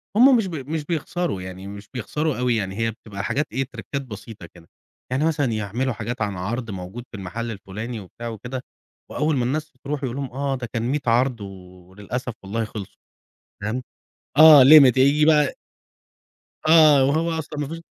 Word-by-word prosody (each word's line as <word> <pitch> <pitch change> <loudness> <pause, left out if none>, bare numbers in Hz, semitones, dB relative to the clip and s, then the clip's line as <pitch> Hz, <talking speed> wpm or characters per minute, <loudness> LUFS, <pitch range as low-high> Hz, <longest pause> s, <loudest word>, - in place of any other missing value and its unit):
هُم 250 +3 +7
مش 210 -4 0
بي 160 -6 -5
مش 150 +2 -4
بيخسَروا 170 - -2
يعني، 95 +1 -8
مش 100 0 -10
بيخسَروا 145 +4 -2
أوي 125 -1 +1
يعني، 95 -3 -2
هي 115 0 0
بتبقى 105 -3 -8
حاجات 140 +8 -1
إيه، 130 +4 -1
تريكّات 130 +4 -5
بسيطة 110 -5 -10
كده، 85 -1 -17 0.4
يعني 135 +4 +1
مثلًا 155 -3 +1
يعمِلوا 110 +5 -2
حاجات 120 +1 -5
عن 100 -3 -2
عرْض 115 +5 -4
موجود 95 +5 -7
في 105 - -7
المحَل 110 +5 -5
الفُلاني 110 +3 -6
وبتاع 110 +5 -9
وكده 120 +3 -6 0.5
وأول 150 0 0
ما 120 - 0
الناس 155 +4 -2
ترُوح 145 0 -4
يقول 125 -2 -3
لهُم 140 -1 -4
آه 135 +1 -2
ده 125 -2 -5
كان 115 - -1
100 135 +5 0
عرْض 120 0 +2
و - - -5 0.5
وللأسف 115 +6 -5
والله 110 +4 -2
خِلصوا 105 -3 -9 0.6
فاهم، 110 +5 -2 0.6
آه 155 -3 +10
limit 135 -2 +8
هييجي 140 +3 +4
بقى 150 -3 +3 1.1
آه 155 -4 +7
وهو 160 +5 +1
أصلًا 150 -1 -6
ما 145 - -2
فيش 165 +3 -7
125 Hz, 180 wpm, -23 LUFS, 110-150 Hz, 1.1 s, آه